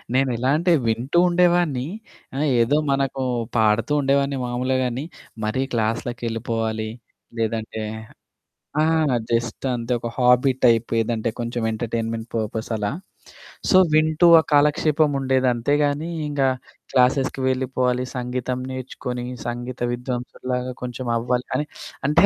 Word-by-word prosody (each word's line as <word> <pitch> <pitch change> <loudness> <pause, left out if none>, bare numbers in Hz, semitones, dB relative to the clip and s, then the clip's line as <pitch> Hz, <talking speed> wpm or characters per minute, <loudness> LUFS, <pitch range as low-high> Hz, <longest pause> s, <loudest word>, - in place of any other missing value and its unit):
నేనెలా 130 -1 +1
అంటే 175 +2 +2 0.2
వింటూ 120 +8 0
ఉండేవాడిని, 175 -6 +3 0.5
ఆహ్, 150 - +1 0.2
ఏదో 130 +6 +3
మనకు 135 -1 0 0.3
పాడుతూ 110 +5 +2
ఉండేవాడిని 140 0 +1
మామూలు 125 +2 -1
గానీ, 125 +2 -2 0.4
మరీ 110 +5 0
క్లాస్‌లకెళ్ళిపోవాలి 115 -1 -2 0.5
లేదంటే 110 -1 -2 1.0
ఆ! - - +4 0.5
జస్ట్ 115 +2 -1
అంతే 120 0 -4
ఒక 120 - -4
హాబీ 125 +1 +5
టైప్ 115 -1 +4
ఏదంటే 115 0 -1
కొంచెం 120 0 -3
ఎంటర్‌టైన్‌మెంట్ 115 0 -3
పర్పస్ 110 0 -3
అలా 105 -1 -1 0.8
సో 185 - +6 0.2
వింటూ 155 +2 +4
ఆ - - +4
కాలక్షేపముండేది. 145 -3 +3
అంతే 120 +4 0
గానీ 145 +3 -1 0.2
ఇంగ 145 -1 -2 0.5
క్లాసెస్‌కి 130 +1 +2
వెళ్ళిపోవాలి, 130 -1 0
సంగీతం 125 0 -2
నేర్చుకొని 125 -1 -5 0.2
సంగీత 120 +1 -5
విద్వాంసుడిలాగా 125 0 -4
కొంచెం 125 0 -5
అవ్వాలి 125 +1 -1
అని, 150 - 0 0.4
అంటే 150 +4 +5
125 Hz, 115 wpm, -23 LUFS, 115-135 Hz, 1.0 s, సో